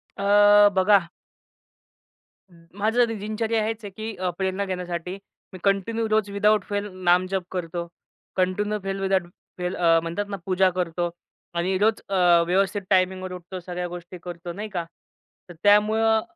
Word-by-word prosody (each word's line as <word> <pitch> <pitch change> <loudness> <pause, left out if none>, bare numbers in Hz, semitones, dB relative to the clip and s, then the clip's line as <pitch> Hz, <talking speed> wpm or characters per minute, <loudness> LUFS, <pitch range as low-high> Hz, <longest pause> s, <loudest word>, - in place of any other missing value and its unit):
अ, 205 +1 +6
बघा 190 -2 +4 1.4
माझं 205 +8 0
दिनचर्या 220 +1 -1
हेच 225 0 -4
आहे 205 - -6
की 220 0 -5
अ, 185 -1 -2
प्रेरणा 190 +1 -1
घेण्यासाठी, 180 -1 -4 0.4
मी 185 - -8
कंटिन्यू 215 +3 +1
रोज 215 -1 +1
विदाऊट 210 0 +3
फेल 205 0 -2 0.2
नामजप 185 +1 +2
करतो. 170 -1 -4 0.5
कंटिन्यू 205 +3 0
फेल 195 0 -3
विदाऊट 190 -2 +1 0.3
फेल 180 +1 -3
अ, 165 -1 +4
म्हणतात 170 +5 -3
ना 200 - -4
पूजा 190 0 +3
करतो 175 -1 -1 0.5
आणि 185 +2 0
रोज 215 +3 +2
अ, 175 -3 +4
व्यवस्थित 195 +3 +1
टायमिंगवर 185 -1 +1
उठतो, 180 +1 -8
सगळ्या 180 0 -5
गोष्टी 175 +1 -9
करतो 175 0 -7
नाही 210 +4 -6
का. 175 -4 -3 0.6
तर - - -9
त्यामुळं 220 +2 +4
190 Hz, 145 wpm, -24 LUFS, 180-205 Hz, 1.4 s, अ